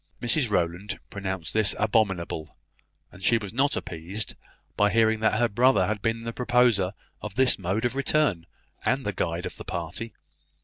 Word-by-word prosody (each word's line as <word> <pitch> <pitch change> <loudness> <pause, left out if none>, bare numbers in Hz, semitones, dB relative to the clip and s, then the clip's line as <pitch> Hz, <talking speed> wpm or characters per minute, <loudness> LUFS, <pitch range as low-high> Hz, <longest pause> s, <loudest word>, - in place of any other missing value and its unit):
Mrs 120 +1 +3
Rowland 90 +2 -1
pronounced 95 -4 -4
this 110 -2 +3
abominable; 95 -7 0 0.5
and 95 - -14
she 115 - +4
was 105 -3 -6
not 140 +4 +2
appeased 90 +6 -4 0.4
by 105 - +3
hearing 110 +1 +3
that 110 0 +2
her 120 +1 +3
brother 115 -2 +3
had 105 +1 -2
been 115 +1 -1
the 115 0 -4
proposer 120 -6 +2 0.3
of 105 -2 -7
this 130 -3 +3
mode 95 +6 -1
of 120 - -1
return, 140 - +1 0.4
and 130 +1 0
the 105 - -1
guide 85 -1 -2
of - - -6
the - - -8
party. 85 +7 -5
105 Hz, 170 wpm, -26 LUFS, 95-120 Hz, 0.5 s, she